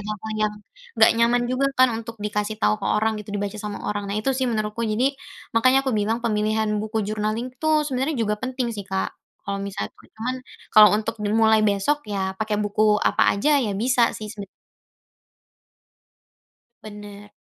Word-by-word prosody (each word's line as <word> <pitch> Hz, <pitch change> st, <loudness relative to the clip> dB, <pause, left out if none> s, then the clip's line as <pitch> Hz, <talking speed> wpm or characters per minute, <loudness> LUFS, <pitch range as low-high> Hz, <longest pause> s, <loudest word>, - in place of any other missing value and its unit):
hal-hal 215 Hz, +1 st, -5 dB, 0.2 s
yang, 210 Hz, -, -10 dB, 0.4 s
nggak 220 Hz, -, +7 dB
nyaman 240 Hz, +1 st, +3 dB
juga 260 Hz, +2 st, +1 dB
kan 255 Hz, 0 st, +6 dB
untuk 230 Hz, 0 st, -6 dB
dikasih 210 Hz, +1 st, -2 dB
tahu 215 Hz, 0 st, +1 dB
ke 195 Hz, -, -3 dB
orang 220 Hz, 0 st, +1 dB
gitu, 210 Hz, -, -13 dB
dibaca 205 Hz, +1 st, -3 dB
sama 210 Hz, -1 st, -6 dB
orang. 205 Hz, -1 st, -3 dB
Nah 200 Hz, -, -2 dB
itu 215 Hz, +6 st, 0 dB
sih 260 Hz, -1 st, -1 dB
menurutku, 215 Hz, 0 st, -2 dB
jadi, 260 Hz, +6 st, +2 dB, 0.4 s
makanya 255 Hz, +4 st, +4 dB
aku 260 Hz, -, 0 dB
bilang 220 Hz, +3 st, -1 dB
pemilihan 215 Hz, -1 st, 0 dB
buku 215 Hz, 0 st, -2 dB
journaling 215 Hz, +4 st, -2 dB
tuh 310 Hz, -1 st, +2 dB
sebenarnya 270 Hz, +2 st, -1 dB
juga 210 Hz, -3 st, 0 dB
penting 255 Hz, -1 st, -2 dB
sih 200 Hz, -, -5 dB
Kak, 190 Hz, 0 st, -1 dB, 0.3 s
kalau 200 Hz, 0 st, -3 dB
misalnya 200 Hz, 0 st, -4 dB
tuh, -, -, -21 dB
cuman 240 Hz, +4 st, -3 dB, 0.4 s
kalau 215 Hz, -1 st, +9 dB
untuk 220 Hz, +1 st, -2 dB
dimulai 220 Hz, +1 st, +3 dB
besok 205 Hz, +9 st, +1 dB
ya 195 Hz, -2 st, -2 dB
pakai 215 Hz, -1 st, -1 dB
buku 205 Hz, +1 st, 0 dB, 0.3 s
apa -, -, +1 dB
aja, 290 Hz, +8 st, +3 dB
ya 225 Hz, -7 st, -1 dB
bisa 240 Hz, +3 st, +2 dB
sih 215 Hz, -1 st, -7 dB
seben 205 Hz, -2 st, -8 dB, 2.4 s
Benar. 205 Hz, -1 st, -11 dB
215 Hz, 170 wpm, -23 LUFS, 210-240 Hz, 2.4 s, kalau